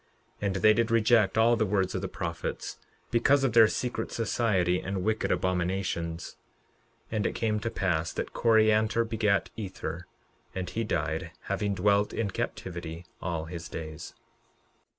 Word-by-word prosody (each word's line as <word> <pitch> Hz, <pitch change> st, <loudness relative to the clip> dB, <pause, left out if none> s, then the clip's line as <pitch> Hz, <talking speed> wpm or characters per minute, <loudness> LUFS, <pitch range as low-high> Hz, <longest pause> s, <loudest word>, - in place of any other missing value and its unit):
11:22 100 Hz, -, +1 dB
And 95 Hz, -, -1 dB
they 110 Hz, +3 st, +5 dB
did 115 Hz, +1 st, +1 dB
reject 110 Hz, -2 st, +4 dB
all 115 Hz, +2 st, +5 dB
the 110 Hz, -, +1 dB
words 95 Hz, -2 st, +1 dB
of 95 Hz, -, -2 dB
the 95 Hz, -, -2 dB
prophets, 85 Hz, -3 st, -4 dB, 0.3 s
because 135 Hz, +4 st, +4 dB
of 130 Hz, -5 st, +2 dB
their 115 Hz, -2 st, +8 dB
secret 120 Hz, 0 st, -3 dB
society 100 Hz, -6 st, +1 dB
and 95 Hz, -1 st, -3 dB
wicked 110 Hz, +2 st, 0 dB
abominations. 90 Hz, -2 st, -1 dB, 0.7 s
11:23 110 Hz, -, -1 dB
And 105 Hz, -, 0 dB
it -, -, -4 dB
came 110 Hz, -2 st, 0 dB
to 115 Hz, -, -2 dB
pass 85 Hz, -6 st, 0 dB
that -, -, -4 dB
Coriantor 110 Hz, 0 st, +3 dB
begat 105 Hz, -4 st, +1 dB
Ether, 100 Hz, -4 st, -5 dB, 0.5 s
and 95 Hz, -1 st, -3 dB
he 115 Hz, -, -1 dB
died, 110 Hz, -, -1 dB
having 100 Hz, -1 st, -1 dB
dwelt 100 Hz, +2 st, +2 dB
in 105 Hz, -4 st, -1 dB
captivity 85 Hz, -2 st, -5 dB, 0.2 s
all 85 Hz, -2 st, -2 dB
his 85 Hz, 0 st, -7 dB
days. 80 Hz, 0 st, -7 dB
100 Hz, 155 wpm, -28 LUFS, 90-110 Hz, 0.7 s, their